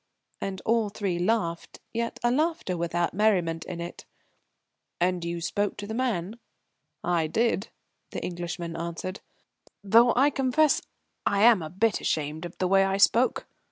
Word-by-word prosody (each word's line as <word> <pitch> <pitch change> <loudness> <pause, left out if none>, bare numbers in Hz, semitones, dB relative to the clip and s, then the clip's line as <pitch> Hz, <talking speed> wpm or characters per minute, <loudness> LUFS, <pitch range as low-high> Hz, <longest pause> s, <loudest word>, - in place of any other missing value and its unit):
And 195 -1 -4
all 225 -2 +2
three 195 -4 -2
laughed, 175 -3 -1
yet 230 0 -2
a 240 - +3
laughter 305 - 0
without 170 0 -1
merriment 180 -6 +1
in 180 -2 -6
it. 170 +1 -7 1.0
"And 180 0 +1
you 170 0 -3
spoke 205 +4 -1
to 205 - -5
the 220 - -5
man?" 225 -4 -2 0.6
"I 170 -3 +1
did," 220 +3 0 0.4
the - - -5
Englishman 175 -1 -5
answered, 170 +3 -5 0.6
"though 230 +4 +6
I 275 +4 +4
confess 275 +3 +2 0.5
I'm 205 0 +5
a 155 - -5
bit 210 +6 +1
ashamed 155 +2 -2
of 175 - -9
the 185 - 0
way 195 +1 +5
I 195 0 0
spoke. 235 +5 +3
195 Hz, 150 wpm, -27 LUFS, 170-230 Hz, 1.0 s, though